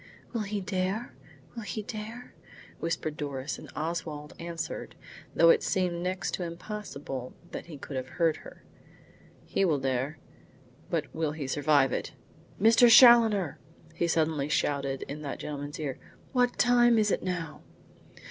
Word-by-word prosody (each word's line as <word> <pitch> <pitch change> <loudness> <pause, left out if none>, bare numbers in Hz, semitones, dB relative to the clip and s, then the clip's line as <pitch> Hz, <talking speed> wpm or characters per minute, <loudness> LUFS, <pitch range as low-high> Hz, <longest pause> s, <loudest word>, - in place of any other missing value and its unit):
"Will 230 - -1
he 205 0 -2
dare? 190 +4 -2 0.4
Will 235 - -6
he 210 +1 -4
dare?" 220 +4 -7 0.5
whispered 155 -2 -2
Doris, 140 -1 -4
and - - -11
Oswald 155 -2 -4
answered, 170 0 -5 0.4
though 165 0 +7
it - - +3
seemed 180 -2 0
next 185 +1 -2
to 180 - -2
impossible 170 - -6 0.2
that - - -6
he 160 -4 -9
could 140 0 -8
have 130 0 -3
heard 165 -2 +3
her: - - -13 0.8
"He - - 0
will 165 -6 +3
dare. 135 +2 -1 0.7
But 165 -5 -2
will 160 -2 -1
he 150 -3 -5
survive 145 -1 +3
it? - - -3 0.5
Mr. 230 +3 +6
Challoner," 225 - +7 0.3
he 170 - 0
suddenly 155 -3 +1
shouted 140 -2 0
in 150 +2 -7
that 140 -2 -4
gentleman's 145 +1 -6
ear, 140 -4 -4 0.3
"what 245 -2 +2
time 240 -1 +5
is 210 -2 +3
it - - 0
now?" 175 -4 -4
165 Hz, 145 wpm, -29 LUFS, 145-210 Hz, 0.8 s, though